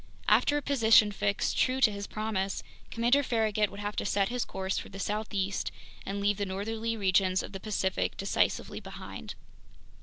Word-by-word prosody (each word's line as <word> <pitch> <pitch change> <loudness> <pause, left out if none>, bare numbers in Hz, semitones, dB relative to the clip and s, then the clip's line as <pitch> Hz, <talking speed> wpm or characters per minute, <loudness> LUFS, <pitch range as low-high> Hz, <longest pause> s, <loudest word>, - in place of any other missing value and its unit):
After 290 - +4
a 295 - -3
position 225 -6 +5
fix, 200 0 0
true 255 0 +1
to 235 -5 +5
his 200 0 -5
promise, 205 -3 -2 0.3
Commander 240 +5 +3
Farragut 215 -5 +1
would 200 - -10
have 205 0 -3
to - - 0
set 200 -1 +1
his 245 0 -1
course 190 0 -2
for - - -9
the 195 - -9
southeast 200 -1 -2 0.4
and 200 +1 -2
leave 200 0 +1
the 205 - -1
northerly 225 +4 -3
regions 190 -2 +2
of - - -8
the 195 - -6
Pacific 190 -2 -1
decisively 195 - 0
behind. - - -8
205 Hz, 175 wpm, -29 LUFS, 195-225 Hz, 0.4 s, position